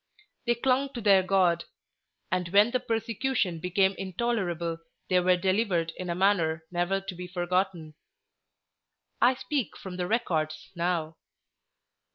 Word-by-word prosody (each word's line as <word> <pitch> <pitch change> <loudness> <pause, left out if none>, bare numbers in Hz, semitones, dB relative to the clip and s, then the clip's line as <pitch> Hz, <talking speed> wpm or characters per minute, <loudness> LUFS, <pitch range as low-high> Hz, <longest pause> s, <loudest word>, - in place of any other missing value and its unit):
They 240 - +3
clung 265 +3 +1
to 240 - -5
their 200 -3 +6
God; 180 -2 +2 0.7
and 180 -2 0
when 205 +5 +5
the 255 - +1
persecution 225 -5 -1
became 190 +3 +2
intolerable, 185 -5 -2 0.3
they 180 - +5
were 180 0 +3
delivered 185 -3 +1
in 180 -1 -6
a 170 - -1
manner 170 -4 +2
never 175 +2 0
to 195 0 -6
be 180 0 -7
forgotten. 180 -2 -1 1.3
I 250 +2 +5
speak 270 -2 -3
from 185 -2 -8
the 180 -1 -2
records 160 -9 -1
now. 170 -2 -1
185 Hz, 135 wpm, -28 LUFS, 175-215 Hz, 1.3 s, their